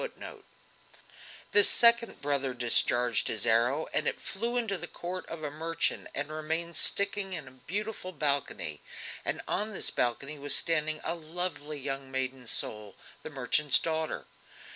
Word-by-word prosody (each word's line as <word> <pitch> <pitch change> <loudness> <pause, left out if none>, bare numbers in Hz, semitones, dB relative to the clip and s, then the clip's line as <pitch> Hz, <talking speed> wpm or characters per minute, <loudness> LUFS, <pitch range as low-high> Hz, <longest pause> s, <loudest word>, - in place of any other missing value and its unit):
The 205 - +10
second 235 +1 +4
brother 140 -3 0
discharged 120 0 +4
his 110 -1 -1
arrow 120 +7 +2
and - - 0
it - - -1
flew 235 +5 -3
into 225 -5 -1
the 175 -1 -5
court 180 +2 -6
of 165 -1 -8
a 150 - -3
merchant 165 +2 -1
and 145 +2 -3
remained 160 +2 -3
sticking 200 -1 +2
in 155 -6 -6
a - - -12
beautiful 190 - -6
balcony, 140 - -1 0.4
and - - -3
on 210 +2 -2
this - - +3
balcony 140 +5 -2
was 145 +1 +2
standing 155 -2 0
a - - -1
lovely 160 -2 -5
young 135 0 -5
maiden 130 -1 -4
soul, 105 -3 0 0.3
the - - -7
merchant's 140 +1 +3
daughter. 160 -1 -3
155 Hz, 145 wpm, -29 LUFS, 130-175 Hz, 0.4 s, The